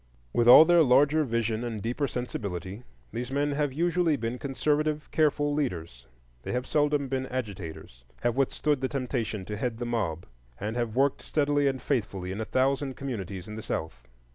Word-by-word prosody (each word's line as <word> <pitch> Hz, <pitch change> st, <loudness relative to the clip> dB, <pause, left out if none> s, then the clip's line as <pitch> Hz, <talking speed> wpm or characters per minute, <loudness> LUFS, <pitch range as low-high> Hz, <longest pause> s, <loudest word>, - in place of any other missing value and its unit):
With 120 Hz, -, +2 dB
all 140 Hz, +6 st, +11 dB
their 175 Hz, 0 st, +5 dB
larger 145 Hz, +3 st, +4 dB
vision 115 Hz, -3 st, -1 dB
and 115 Hz, -3 st, -3 dB
deeper 120 Hz, +7 st, -1 dB
sensibility, 100 Hz, -5 st, -5 dB, 0.3 s
these 125 Hz, +1 st, -4 dB
men 145 Hz, +2 st, 0 dB
have 145 Hz, 0 st, 0 dB
usually 170 Hz, +2 st, +1 dB
been 120 Hz, 0 st, -3 dB
conservative, 150 Hz, +2 st, 0 dB
careful 145 Hz, -1 st, +2 dB
leaders. 85 Hz, -, -3 dB, 0.3 s
They -, -, -5 dB
have 125 Hz, +1 st, -1 dB
seldom 145 Hz, -2 st, +1 dB
been 130 Hz, 0 st, -2 dB
agitators, 95 Hz, -, -6 dB, 0.2 s
have 120 Hz, -1 st, +1 dB
withstood 140 Hz, +1 st, +1 dB
the 130 Hz, -, 0 dB
temptation 115 Hz, -6 st, -3 dB
to 105 Hz, +2 st, -5 dB
head 115 Hz, 0 st, -2 dB
the 120 Hz, -, -4 dB
mob, 100 Hz, -9 st, -2 dB, 0.3 s
and 105 Hz, +3 st, -3 dB
have 120 Hz, -2 st, -2 dB
worked 135 Hz, +1 st, +2 dB
steadily 145 Hz, -1 st, +1 dB
and 135 Hz, -1 st, 0 dB
faithfully 100 Hz, -10 st, -2 dB
in 100 Hz, +3 st, -4 dB
a -, -, -2 dB
thousand 135 Hz, +2 st, 0 dB
communities 100 Hz, -8 st, -5 dB
in 105 Hz, 0 st, -7 dB
the -, -, -5 dB
South. 60 Hz, -, -5 dB
125 Hz, 175 wpm, -28 LUFS, 105-145 Hz, 0.3 s, all